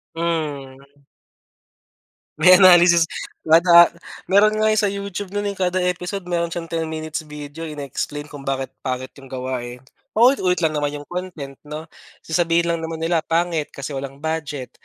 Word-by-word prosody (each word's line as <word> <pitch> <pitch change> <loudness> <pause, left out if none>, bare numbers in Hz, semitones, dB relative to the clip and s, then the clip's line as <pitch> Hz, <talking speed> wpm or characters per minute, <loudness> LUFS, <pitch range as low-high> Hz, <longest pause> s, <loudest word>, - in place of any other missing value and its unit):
Mm. 145 -4 -4 1.4
May 185 0 +8
analysis 175 -2 +7 0.4
wa 160 +1 +6
da 170 -1 +7 0.4
meron 215 +2 +5
nga 215 0 +2
sa - - +3
YouTube 200 -1 -5
no'n, 205 0 -1
eh. 200 - -9
Kada 185 0 +1
episode 180 +2 -6
meron 170 -1 0
siyang 165 -1 -5
10 165 -1 -1
minutes 155 0 -4
video, 150 +2 -8
ine-explain 145 +1 -5
kung 145 -2 -9
bakit 135 -1 -3
pangit 130 0 -3
'yong 135 - -13
gawa, 130 0 -3 0.2
eh. 125 - -10 0.4
Paulit-ulit 215 - +4
lang 160 - +3
naman 145 -1 -1
'yong 145 0 -9
content 170 -7 -6
'no? 150 +1 -6 0.4
Sasabihin 170 +1 +1
lang 170 - -1
naman 160 0 -5
nila 165 0 +2
pangit 165 -2 0
kasi 140 +2 -6
walang 135 0 -6
budget 150 -5 -4
165 Hz, 160 wpm, -21 LUFS, 145-180 Hz, 1.4 s, May